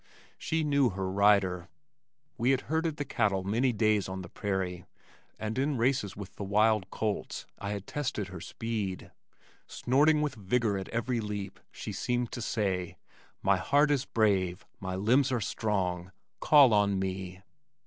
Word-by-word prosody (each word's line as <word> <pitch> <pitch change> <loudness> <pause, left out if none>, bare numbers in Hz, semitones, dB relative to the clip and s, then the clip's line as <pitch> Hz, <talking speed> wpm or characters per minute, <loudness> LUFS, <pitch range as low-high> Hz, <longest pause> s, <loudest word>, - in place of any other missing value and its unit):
She 160 0 -1
knew 140 -4 +3
her 95 -1 -3
rider. 95 -3 +3 0.7
We 125 +1 +1
had 135 -1 +3
herded 160 0 -1
the 145 - -3
cattle 105 -7 0
many 115 +7 +1
days 105 -3 +1
on 95 0 -5
the 85 - -10
prairie, 95 -4 -3 0.5
and 110 +3 -3
in 140 0 0
races 120 -5 0
with 100 -2 -9
the - - -4
wild 105 0 +2
colts 105 0 -3
I 100 - -4
had 100 -1 -4
tested 125 -9 -3
her 90 -2 -8
speed. 105 -3 -4 0.6
Snorting 150 +4 +3
with 150 -3 -1
vigor 110 0 0
at 95 - -7
every 120 +1 -1
leap 105 -2 -5
she - - -6
seemed 120 -1 -1
to 120 - -5
say, 95 -6 -2 0.5
"My 95 0 +4
heart 145 +9 +3
is 140 -2 +1
brave, 95 -5 +1
my 95 -1 -4
limbs 125 +8 +3
are 125 - +1
strong. 95 -5 -2 0.3
Call 140 -6 +6
on 100 -1 +3
me." 95 -1 -4
105 Hz, 160 wpm, -30 LUFS, 95-125 Hz, 0.7 s, Call